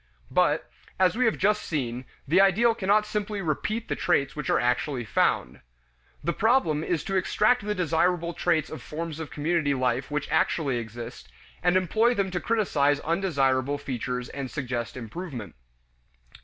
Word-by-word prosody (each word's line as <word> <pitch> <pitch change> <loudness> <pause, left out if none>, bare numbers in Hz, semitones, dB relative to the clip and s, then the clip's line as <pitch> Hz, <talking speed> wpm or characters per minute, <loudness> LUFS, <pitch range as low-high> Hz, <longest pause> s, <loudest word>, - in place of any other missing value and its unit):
But, - - +2 0.3
as 185 +1 +4
we 250 +1 +2
have 225 - +2
just 210 +1 +2
seen, 125 -5 -3 0.2
the 175 +7 +5
ideal 215 +5 +4
cannot 210 -1 +2
simply 210 -1 -3
repeat 205 +7 -2
the - - -1
traits 140 -6 +1
which 150 -3 -4
are - - +3
actually 125 +1 0
found. 65 -10 +1 0.6
The 170 +3 0
problem 220 - +2
is 170 -2 -1
to 195 - -3
extract 210 +7 +2
the 210 0 -2
desirable 170 0 +1
traits 155 -1 0
of 155 - -7
forms 160 0 -5
of 160 -3 -5
community 150 +2 0
life 130 0 0
which 150 0 -2
actually 140 -6 +1
exist, 115 - -7 0.3
and 175 +1 +3
employ 220 +7 +2
them 195 -3 0
to 180 - -1
criticize 150 -11 +1
undesirable 145 -6 +1
features 125 -3 -4
and 135 -2 -5
suggest 120 -4 -4
improvement. 120 - -7
160 Hz, 155 wpm, -26 LUFS, 130-195 Hz, 0.6 s, the